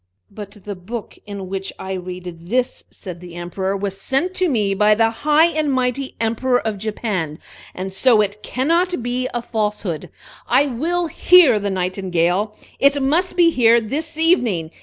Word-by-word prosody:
"But 205 -1 -10
the 205 - -5
book 205 +5 -7
in 200 -2 -6
which 195 0 -4
I 190 - -6
read 180 -2 -7
this," 245 +4 -1
said 175 -3 -9
the 175 -1 -11
Emperor, 190 +3 -3
"was 195 0 -4
sent 300 - 0
to 370 -2 +2
me 210 -7 +1
by 210 +2 +4
the 225 +1 +3
high 300 +6 +3
and 310 -3 0
mighty 260 +1 -1
Emperor 240 +3 +1
of 215 -3 -3
Japan, 195 -7 -3 0.4
and 190 +1 -5
so 230 +3 +4
it 205 0 0
cannot 335 - 0
be 250 +1 -1
a 240 -1 -3
falsehood. 210 -7 -3 0.4
I 285 - +4
will 325 +7 -1
hear 325 -6 +5
the 200 0 -2
Nightingale! 185 +1 -1 0.2
It 280 +1 +4
must 320 +8 +1
be 340 -1 +5
here 235 -4 +5
this 295 +8 -4
evening! 240 - +2
220 Hz, 165 wpm, -20 LUFS, 190-270 Hz, 0.4 s, hear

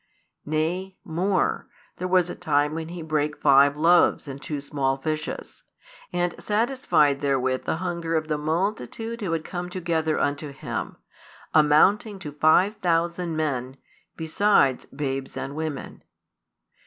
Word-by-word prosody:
Nay, 175 +5 -1
more, 185 +4 0 0.3
there 180 - -3
was 180 -1 +3
a - - -5
time 150 0 +1
when 160 0 -4
He 170 -1 -6
brake 150 -1 -1
five 140 0 +5
loaves 170 -1 +4
and 140 0 -7
two 150 -1 -4
small 140 -1 -1
fishes, 155 +2 -4 0.5
and 175 -1 0
satisfied 210 - +2
therewith 130 -2 0
the - - 0
hunger 170 -1 -2
of 155 -1 0
the 150 -1 -1
multitude 210 +8 -2
who 190 -5 -2
had 165 -1 -1
come 180 -1 -5
together 165 -3 -1
unto 145 +1 -1
Him, 140 - -5 0.6
amounting 185 +8 +4
to 180 -6 -7
five 160 +8 +3
thousand 170 -2 0
men, 135 -4 -2 0.4
besides 160 -5 +2
babes 135 -2 -4
and 135 +2 -5
women. 155 -3 -5
160 Hz, 135 wpm, -25 LUFS, 145-180 Hz, 0.6 s, five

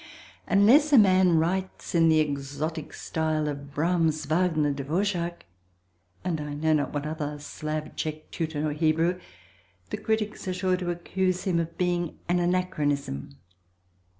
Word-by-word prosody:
Unless 245 +10 +5
a 280 - +7
man 185 -5 +5
writes 185 +4 -1
in 165 -1 +5
the 160 -1 +5
exotic 150 +2 -2
style 155 -1 -1
of 140 -1 -5
Brahms, 160 0 +1
Wagner, 155 -2 +2
Dvořák 170 +5 -1 0.8
and 170 -4 -1
I 150 -1 -5
know 155 +2 +2
not 150 -2 +1
what 145 0 -3
other 150 -1 -3
Slav, 155 +1 -5
Czech, 155 0 -5
Teuton 155 -2 -2
or 150 - -1
Hebrew, 165 +3 +1 0.7
the - - -2
critics 220 -2 -2
are 185 - -1
sure 185 0 +1
to 180 -1 -3
accuse 180 +1 -1
him 185 -4 +1
of 165 0 -4
being 175 -2 -1
an 175 +1 +2
anachronism. 145 - -1
160 Hz, 145 wpm, -27 LUFS, 150-180 Hz, 0.8 s, a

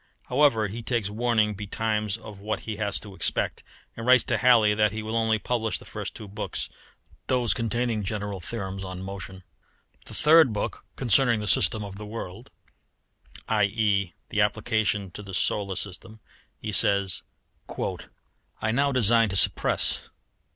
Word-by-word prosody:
However, 125 -5 +4
he 110 +4 -6
takes 115 -4 -1
warning 110 -1 +2
betimes 105 +1 -2
of 105 -3 -11
what 110 +2 -3
he 110 -2 -5
has 105 -2 -1
to 100 -2 -10
expect, - - -1 0.3
and 115 - -6
writes 125 +1 +6
to 120 -3 0
Halley 115 -2 +5
that 105 0 +2
he 110 +1 -5
will 110 +1 -3
only 110 -1 +2
publish 115 0 -1
the - - -14
first - - -6
two 105 - -8
books, 100 - -4 0.6
those 125 -3 +2
containing 115 -1 -1
general 100 -1 -3
theorems 95 0 -5
on 95 0 -6
motion. 95 -1 -7 0.6
The - - -7
third 155 -5 +6
book 105 - -4
concerning 120 -1 +4
the 105 - -4
system 105 -3 +3
of 100 -1 -8
the 105 - -7
world, 110 0 -7 1.0
i.e. 105 -3 +1
the 105 - +1
application 105 -2 0
to 105 - -8
the 95 -2 -7
solar 100 0 0
system 105 +3 -7 0.4
he 105 - -4
says 100 -2 +3 1.4
"I 110 - 0
now 140 +4 +2
design 115 -3 +4
to 95 - -3
suppress. 95 - +2
105 Hz, 155 wpm, -26 LUFS, 100-115 Hz, 1.4 s, writes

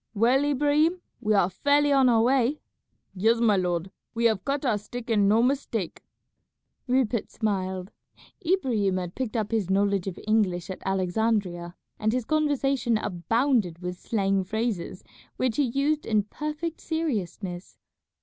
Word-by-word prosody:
"Well, 245 +6 +3
Ibrahim, 295 +5 +2 0.2
we 215 -3 +1
are 195 -3 +4
fairly 285 +9 +2
on 265 -2 +5
our 225 -2 +4
way." 265 +3 +2 0.5
"Yes, 225 +5 +2
my 225 -3 +4
lord, 180 -1 -1 0.2
we 235 +1 0
have 215 -5 +2
cut 280 +1 -2
our 220 -5 +1
stick 240 +3 -7
and 205 -3 +4
no 220 +3 +4
mistake." 245 - -1 0.9
Rupert 245 -3 +1
smiled. 190 -3 -2 0.5
Ibrahim 245 - +1
had 180 -1 -4
picked 245 -3 -3
up 215 -1 -2
his 215 -5 0
knowledge 200 -1 +1
of 185 - -4
English 195 -5 +1
at 185 - -8
Alexandria, 185 -2 -1 0.2
and 215 +1 +1
his 250 -2 -1
conversation 275 -6 +1
abounded 215 - 0
with 180 0 -6
slang 195 -3 0
phrases 205 -2 -3 0.3
which 255 -3 0
he 290 - +4
used 280 +5 0
in 215 -2 +2
perfect 305 +8 -5
seriousness. 200 - -3
220 Hz, 145 wpm, -26 LUFS, 190-265 Hz, 0.9 s, on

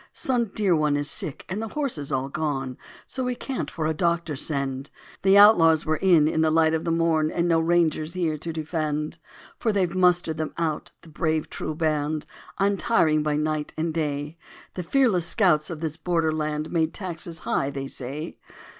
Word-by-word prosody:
Some 245 -3 0
dear 195 -3 +1
one 150 -2 +1
is 145 0 -1
sick 175 -10 -2
and 190 +4 -3
the 225 - -3
horses 235 - -3
all 135 0 -1
gone, 135 -3 -3 0.3
So 260 - -3
we 250 0 -1
can't 265 +1 -4
for 160 - -4
a 160 - +1
doctor 170 -1 0
send; 135 -1 -2 0.3
The 195 +1 +5
outlaws 170 -6 +7
were 155 -1 0
in 170 -5 +4
in 160 0 +1
the 160 - +3
light 160 0 +3
of 160 - -1
the 165 - 0
morn 165 -2 +2
And 170 +1 0
no 165 -1 +3
Rangers 165 -1 +1
here 170 -4 -1
to 165 +2 -5
defend. 155 0 -3 0.4
For 225 - +1
they've 190 -4 0
mustered 180 -3 +2
them 155 -1 -4
out, 160 -3 -2
the 165 - -15
brave 155 -1 -1
true 155 - -4
band, 155 -1 -1 0.3
Untiring 195 -5 +2
by 150 -1 0
night 150 0 -2
and 160 0 -1
day. 150 0 -3 0.3
The 180 - -4
fearless 190 -4 +2
scouts 165 -8 +2
of 160 -3 -6
this 160 -1 -3
border 165 -1 0
land 155 0 -2
Made 165 -1 +1
the - - -6
taxes 170 -3 -4
high, 135 - 0
they 140 -1 -5
say. 140 +4 -6
160 Hz, 190 wpm, -25 LUFS, 150-175 Hz, 0.4 s, outlaws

